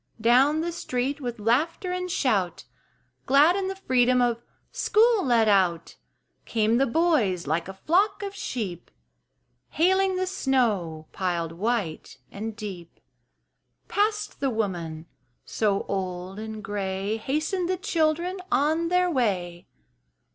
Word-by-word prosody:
Down 260 +7 +4
the 345 +1 -2
street, 275 -2 -3
with 245 -2 -4
laughter 290 - 0
and 365 0 -3
shout, 200 - 0 0.6
Glad 290 +6 +5
in 390 -1 -1
the 385 - -3
freedom 255 -8 +2
of 240 -1 +1 0.3
"school 450 -1 +3
let 235 -4 +3
out," 185 -5 +2 0.5
Came 225 0 +1
the 275 - +3
boys 240 - +1
like 165 +4 -1
a 190 - -6
flock 375 - +1
of 400 -1 -4
sheep, 215 - -5 0.8
Hailing 380 +3 +2
the 370 0 0
snow 215 - 0
piled 170 -3 -2
white 195 - -3
and 220 +2 -5
deep. 190 -6 -8 0.9
Past 425 +1 -1
the 275 - +1
woman 175 -8 -3 0.4
so 205 -3 0
old 185 0 -4
and 220 -1 -7
gray 195 +1 -2
Hastened 310 - -1
the 370 - 0
children 340 0 0
on 315 +4 +2
their 360 +1 +2
way. 190 - -1
240 Hz, 125 wpm, -26 LUFS, -, 0.9 s, Glad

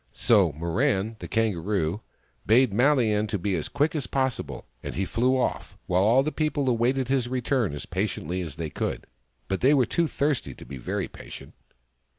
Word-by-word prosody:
So 100 -8 +4
Mirran, 100 - 0
the - - -7
Kangaroo, 100 -3 0 0.5
bade 120 +2 +5
MaHan 110 -4 +2
be 95 +1 0
as 80 - -3
quick 150 +2 +1
as 150 -4 -3
possible, 130 -2 -2 0.2
and - - -6
he 95 - 0
flew 125 +7 +1
off, 125 - -2
while 90 +1 +2
all 115 +7 +4
the 155 - -1
people 155 -3 -1
awaited 125 +2 +1
his 130 -2 +1
return 125 - 0
as 75 - -6
patiently 90 -2 -2
as 80 -5 -6
they 80 -2 -4
could. - - -3 0.4
But 95 - -2
they 140 +4 +5
were 130 -3 +4
too 170 +8 +1
thirsty 140 - -1
to - - -12
be 70 - -8
very - - -3
patient. - - -11
115 Hz, 175 wpm, -26 LUFS, 95-130 Hz, 0.5 s, bade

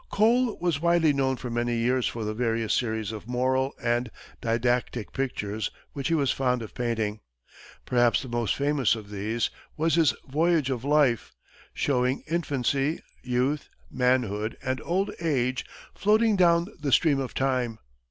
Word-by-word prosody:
Cole 235 +3 +3
was 170 -4 0
widely 170 -3 +4
known 135 -1 +1
for 125 -1 -6
many 120 0 0
years 125 +2 +1
for 115 - -4
the 105 0 -2
various 115 -1 0
series 110 -3 -1
of 110 0 -8
moral 130 +2 0
and 120 0 0 0.3
didactic 120 0 0
pictures 110 -5 -2 0.2
which 140 -2 -3
he 165 - +2
was 140 -4 +2
fond 125 -3 0
of 110 - -9
painting. 110 -3 -2 0.7
Perhaps 120 -3 +3
the - - -7
most 120 -4 0
famous 140 -4 +2
of 105 -2 -10
these 110 +3 -1 0.3
was 160 +1 +1
his 160 -4 +4
"Voyage 155 0 +2
of 125 -2 -3
Life," 140 -5 +2 0.4
showing 125 -1 0
infancy, 145 -2 0 0.2
youth, 125 +4 -1 0.2
manhood, 120 -4 0
and 130 0 -2
old 190 +4 0
age 130 -6 0 0.3
floating 215 +1 +3
down 170 -2 +4
the 145 -2 -2
stream 145 -1 +4
of 130 -2 -4
time. 125 -4 0
130 Hz, 150 wpm, -27 LUFS, 120-150 Hz, 0.7 s, widely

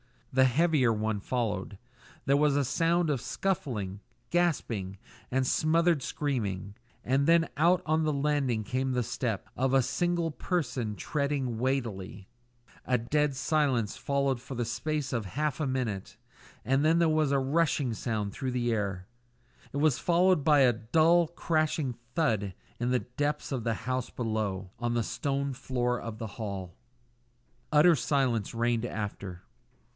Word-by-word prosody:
The 130 0 +5
heavier 140 -1 +3
one 110 -1 -1
followed. 105 -3 -2 0.5
There 140 +1 +4
was 145 -1 +3
a 145 -1 +2
sound 165 +4 +2
of 135 -5 -1
scuffling, 125 - -2 0.3
gasping, 115 - 0 0.3
and 130 +1 +1
smothered 165 +2 +2
screaming; 110 -8 -3 0.3
and 135 +3 +1
then 165 0 +4
out 175 +4 +4
on 155 0 +2
to 160 - +1
the 155 - +1
landing 140 -5 0
came 130 +3 -1
the 125 -1 +1
step - - -3
of 130 +1 0
a 135 -1 +5
single 170 +6 0
person 130 - -2
treading 140 -4 -2
weightily. 115 -7 -2 0.6
A 125 - +2
dead 145 +4 0
silence 135 -6 +1
followed 140 -2 0
for 135 +1 -7
the 120 -1 -1
space 150 +4 -2
of 115 -4 -1
half 150 - -2
a 150 - 0
minute, 115 -6 -3 0.5
and 135 +5 +2
then 160 +2 +4
was 155 -2 +2
heard 140 - +2
a - - +3
rushing 140 -2 +1
sound 110 -3 -2
through 130 +4 -3
the 120 -1 0
air. 100 -4 -2 0.7
It - - -2
was 145 -3 +3
followed 175 -2 +3
by 150 -3 +6
a 125 -2 +5
dull, 160 +9 +3
crashing 155 -4 0 0.2
thud 105 - +1 0.2
in 120 +1 0
the 125 0 +2
depths 145 +5 -3
of 125 -4 -2
the 115 - +1
house 130 +3 -3
below 105 -5 -3
on 120 0 -1
the 120 - +1
stone 140 +3 -2
floor 125 -1 -1
of 115 -2 -6
the 115 - -5
hall. 100 -4 -6 1.0
Utter 160 +3 +6
silence 125 -6 0
reigned 120 0 +1
after. 100 -5 -5
130 Hz, 155 wpm, -29 LUFS, 115-150 Hz, 1.0 s, by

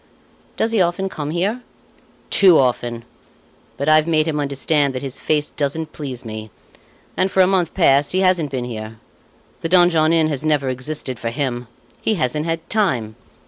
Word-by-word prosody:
"Does 225 - 0
he 220 -4 +2
often 180 +2 0
come 150 -5 -5
here?" 195 +9 -1 0.7
"Too 185 -5 +6
often. 120 -2 0 0.7
But 140 - -3
I've 155 +1 +5
made 155 -1 +2
him 150 -2 -1
understand 140 0 0
that 130 - -4
his 135 -1 -6
face 150 -1 0
doesn't 155 +2 -3
please 130 -5 -6
me, 110 0 -7 0.7
and, 185 - +1
for 190 - +3
a - - +6
month 180 -3 0
past, 140 -5 +3
he 185 - +1
hasn't 180 -5 +2
been 130 -2 -3
here. 110 -2 -7 0.6
The 165 - -3
Donjon 175 -3 +4
Inn 160 -2 +3
has 145 -2 -3
never 150 -4 +1
existed 130 -1 -3
for 115 - -2
him! 125 -2 -3 0.3
he 220 - +1
hasn't 150 0 -1
had 165 0 -3
time! 125 - 0
150 Hz, 175 wpm, -20 LUFS, 130-170 Hz, 0.7 s, Too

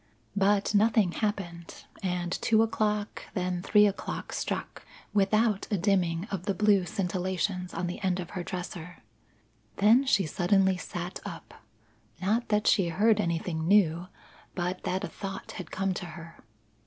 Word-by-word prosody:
But 200 +1 +2
nothing 210 -2 +4
happened, 175 -5 -4 0.2
and 180 -2 -2
two 220 +4 +3
o'clock, 210 -2 -1
then 180 -2 -1
three 210 +2 +5
o'clock 200 -1 -3
struck, - - -4 0.3
without 210 +1 +2
a 205 - +1
dimming 180 -2 +1
of 185 -3 -4
the 200 - +1
blue 205 -2 +3
scintillations 185 0 -2
on 170 +2 -2
the 175 - -4
end 185 -2 0
of 175 - -6
her 185 - -4
dresser. 180 -3 -7 0.7
Then 225 - +5
she 195 -7 +3
suddenly 190 +4 +2
sat 175 0 -5
up. - - -8 0.7
Not 220 +6 0
that 210 0 +2
she 190 -4 +4
heard 210 +5 +3
anything 165 -2 -2
new, 180 -3 +3 0.5
but 180 +1 -2
that 190 +2 -1
a - - -1
thought 195 -1 -7
had - - -7
come 195 0 -1
to 180 -1 -5
her. 165 0 -11
190 Hz, 150 wpm, -28 LUFS, 175-205 Hz, 0.7 s, three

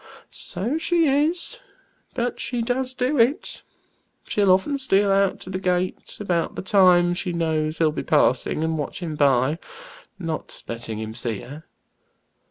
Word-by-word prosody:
"So 245 +12 -3
she 340 0 +2
is, 320 - 0 0.6
but 245 -1 -2
she 245 -2 -2
does 255 +2 -2
do 255 +3 0
it. 245 +6 +1 0.6
She'll 205 -2 +1
often 235 +10 +2
steal 200 -6 +2
out 195 -1 +2
to 185 - -8
the 185 - -2
gate 180 0 -2
about 175 -5 -1
the - - -5
time 180 -2 +5
she 180 0 -3
knows 160 -2 -1
he'll 160 -2 +3
be - - -4
passing, 150 0 +2
and 160 -1 -1
watch 145 +5 -4
him 160 -2 -3
by, 140 +1 +2 0.6
not 165 -4 -5
letting 115 -2 -5
him 110 0 -5
see 115 -3 -2
her. 145 +5 -10
185 Hz, 155 wpm, -23 LUFS, 155-245 Hz, 0.6 s, time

